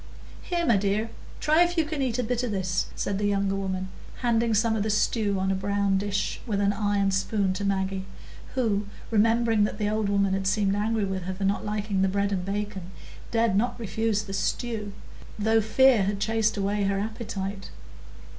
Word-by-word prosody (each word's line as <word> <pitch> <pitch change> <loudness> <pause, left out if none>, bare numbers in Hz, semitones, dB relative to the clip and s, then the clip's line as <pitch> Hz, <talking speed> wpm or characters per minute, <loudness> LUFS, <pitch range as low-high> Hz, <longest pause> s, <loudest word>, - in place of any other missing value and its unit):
"Here, 345 -1 -1
my 235 -9 +4
dear, 205 +3 0 0.3
try 310 +2 +3
if 350 0 +2
you 325 - +3
can 305 -2 -3
eat 255 -3 0
a 250 - 0
bit 245 +1 -1
o' - - 0
this," 185 -2 -1
said 200 0 -2
the 205 - +1
younger 200 -1 +1
woman, 190 -1 -3 0.3
handing 235 -2 +2
some 220 +1 +2
of 215 - 0
the 215 - -1
stew 210 -1 +1
on 190 0 +1
a - - +1
brown 200 0 +1
dish 205 0 -2
with 205 -3 0
an 200 0 +2
iron 205 -1 +1
spoon 195 0 0
to 200 - -4
Maggie, 190 -1 -1 0.5
who, 210 -5 0 0.2
remembering 225 0 +3
that 210 - -4
the 210 -1 0
old 215 -1 0
woman 200 -1 +2
had 195 0 -1
seemed 200 0 +2
angry 215 0 0
with 190 -2 -3
her 185 0 -3
for 195 - -5
not 200 +1 0
liking 210 -2 -1
the 195 - +4
bread 200 +1 0
and 185 -2 -1
bacon, 200 -2 -4 0.4
dared 230 -3 +2
not 240 +4 0
refuse 220 0 -1
the 195 -2 -7
stew, 210 +1 -2 0.5
though 220 +1 +3
fear 240 +2 +5
had 200 0 -1
chased 220 +1 +1
away 200 +1 0
her 195 0 +1
appetite. 200 -2 -4
205 Hz, 200 wpm, -26 LUFS, 195-225 Hz, 0.5 s, fear